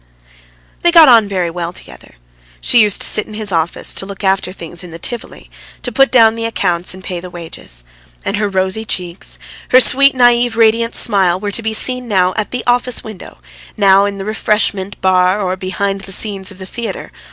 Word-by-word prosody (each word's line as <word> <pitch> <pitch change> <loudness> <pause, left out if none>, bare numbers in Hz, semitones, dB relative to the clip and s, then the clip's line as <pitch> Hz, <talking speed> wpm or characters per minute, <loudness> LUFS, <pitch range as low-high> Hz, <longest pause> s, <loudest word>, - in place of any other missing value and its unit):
They 345 - +3
got 330 -3 +8
on 225 -4 +5
very 185 -4 -2
well 170 0 -5
together. 65 - -13 0.4
She 240 - +4
used 210 -2 +2
to - - +4
sit 215 - 0
in 215 - -10
his 210 -2 +1
office, 165 -1 -1
to - - -2
look 200 0 -9
after 190 -1 0
things 175 -1 -7
in 180 - -10
the 165 - -9
Tivoli, 235 +7 -7 0.3
to 245 - -2
put 270 +3 +3
down 225 -3 +5
the 230 0 -4
accounts 180 -5 -1
and 185 - -13
pay 180 -2 -5
the 180 +1 -9
wages. 165 - -7 0.4
And 205 - -1
her 210 -1 -1
rosy 190 +2 -1
cheeks, 180 -4 -2 0.3
her 255 - +6
sweet, 275 +2 +5
naïve, 245 -1 +3
radiant 230 +1 +2
smile, 190 -5 +1
were 205 +1 -4
to 230 - -2
be 220 0 -3
seen 250 +1 +1
now 185 -4 +1
at 215 -2 -2
the 250 - -5
office 245 0 +1
window, 215 -4 -11 0.4
now 195 -1 +4
in 200 -1 -4
the 195 - -6
refreshment 210 -2 -1
bar 185 +1 +2
or 185 -2 -2
behind 195 +1 -3
the 195 0 -9
scenes 195 -1 -1
of 195 - -12
the 190 - -9
theatre. 235 +4 -7
200 Hz, 205 wpm, -15 LUFS, 185-225 Hz, 0.4 s, got